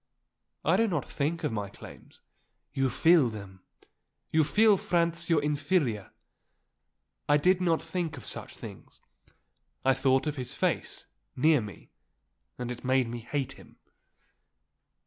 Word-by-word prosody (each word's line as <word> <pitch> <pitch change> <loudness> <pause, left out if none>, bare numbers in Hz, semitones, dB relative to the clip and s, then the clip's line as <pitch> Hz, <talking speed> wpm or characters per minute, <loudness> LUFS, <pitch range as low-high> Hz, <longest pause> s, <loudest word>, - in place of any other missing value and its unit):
"I 165 +4 +4
do 225 +1 +3
not 170 -9 -2
think 165 +4 -2
of 150 - 0
my 105 -2 -3
claims." - - -14 0.5
"You 135 -1 +1
feel 160 +1 +4
them. 100 -4 -9 0.7
You 160 0 +4
feel 210 +7 +5
Franz 170 -2 0
your 155 -4 +3
inferior." 145 - 0 1.2
"I 145 - +6
did 185 +5 +3
not 165 -3 +1
think 165 -2 -3
of 125 - -10
such - - -2
things. - - -11 0.9
I 135 - +5
thought 130 +1 +2
of 150 -1 -2
his 125 -1 -5
face, - - -1 0.3
near 150 +1 +4
me, 105 -2 -10 0.7
and 125 0 -4
it 120 - -7
made 130 -2 +2
me 120 0 -5
hate 130 +3 -3
him." - - -16
145 Hz, 140 wpm, -29 LUFS, 125-170 Hz, 1.2 s, I